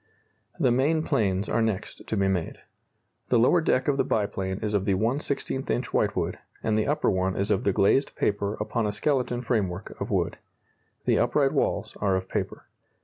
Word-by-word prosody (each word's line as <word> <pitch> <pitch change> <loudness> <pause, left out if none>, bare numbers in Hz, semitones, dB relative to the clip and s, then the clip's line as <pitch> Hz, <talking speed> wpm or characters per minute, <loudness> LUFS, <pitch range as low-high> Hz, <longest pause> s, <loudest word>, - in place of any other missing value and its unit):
The 125 - +3
main 150 +6 +2
planes 100 -5 0
are 115 - +1
next 110 -3 -3
to 110 - -1
be 95 0 +2
made. 90 -4 -1 0.7
The 125 - +4
lower 130 +9 +4
deck 130 -5 +1
of 140 -2 +2
the - - +3
biplane 95 -3 -1
is 105 -1 -2
of 100 -2 +1
the 100 -2 +2
1/16 130 +5 -1
inch - - -1
whitewood, - - 0 0.2
and 110 - +1
the 110 - +1
upper 150 - +2
one 95 0 0
is 100 +2 0
of 100 - +1
the 100 - +4
glazed 100 +9 +2
paper 100 0 0
upon 110 +1 -1
a - - 0
skeleton 125 -1 0
framework 100 -6 -2
of - - -2
wood. - - 0 0.7
The - - +3
upright - - +2
walls - - 0
are 100 -2 +2
of 95 0 -2
paper. - - -3
105 Hz, 190 wpm, -26 LUFS, 95-125 Hz, 0.7 s, The